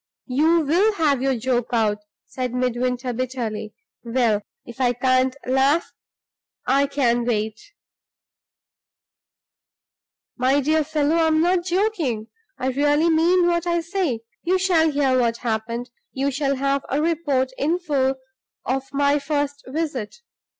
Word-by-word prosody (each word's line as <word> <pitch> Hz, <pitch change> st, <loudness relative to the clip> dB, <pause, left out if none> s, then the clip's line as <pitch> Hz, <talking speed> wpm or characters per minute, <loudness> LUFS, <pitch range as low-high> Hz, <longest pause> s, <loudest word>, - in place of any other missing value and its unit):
"You 315 Hz, +6 st, +3 dB
will 355 Hz, +9 st, +2 dB
have 295 Hz, -8 st, +1 dB
your 270 Hz, 0 st, +1 dB
joke 245 Hz, 0 st, 0 dB
out," 215 Hz, -3 st, +1 dB, 0.3 s
said 250 Hz, -2 st, -4 dB
Midwinter, 250 Hz, 0 st, -1 dB
bitterly. 230 Hz, -4 st, -4 dB, 0.3 s
"Well, 230 Hz, -3 st, +1 dB, 0.2 s
if 240 Hz, +2 st, -9 dB
I 245 Hz, -1 st, +3 dB
can't 255 Hz, +1 st, +2 dB
laugh, 270 Hz, +6 st, +2 dB, 0.7 s
I 275 Hz, +2 st, +3 dB
can 245 Hz, -4 st, +1 dB
wait." 220 Hz, -2 st, -1 dB, 2.8 s
"My 260 Hz, +3 st, +3 dB
dear 310 Hz, +3 st, +2 dB
fellow, 305 Hz, +1 st, 0 dB
I'm 320 Hz, -1 st, +3 dB
not 350 Hz, +1 st, +2 dB
joking; 345 Hz, -, -1 dB, 0.3 s
I 260 Hz, -, -1 dB
really 290 Hz, +5 st, +2 dB
mean 345 Hz, +3 st, +3 dB
what 345 Hz, 0 st, +1 dB
I 340 Hz, 0 st, +1 dB
say. 330 Hz, -, -2 dB, 0.2 s
You 365 Hz, +2 st, +1 dB
shall 350 Hz, -4 st, +3 dB
hear 275 Hz, -3 st, +2 dB
what 235 Hz, -1 st, +1 dB
happened; 235 Hz, +2 st, -3 dB, 0.2 s
you 275 Hz, +1 st, -1 dB
shall 275 Hz, 0 st, 0 dB
have 275 Hz, +1 st, 0 dB
a 280 Hz, -, 0 dB
report 295 Hz, -5 st, 0 dB
in 320 Hz, +5 st, +1 dB
full 275 Hz, -6 st, 0 dB, 0.5 s
of 270 Hz, +1 st, -2 dB
my 285 Hz, +1 st, +2 dB
first 285 Hz, 0 st, -2 dB
visit. 275 Hz, -, -3 dB
275 Hz, 130 wpm, -22 LUFS, 250-315 Hz, 2.8 s, You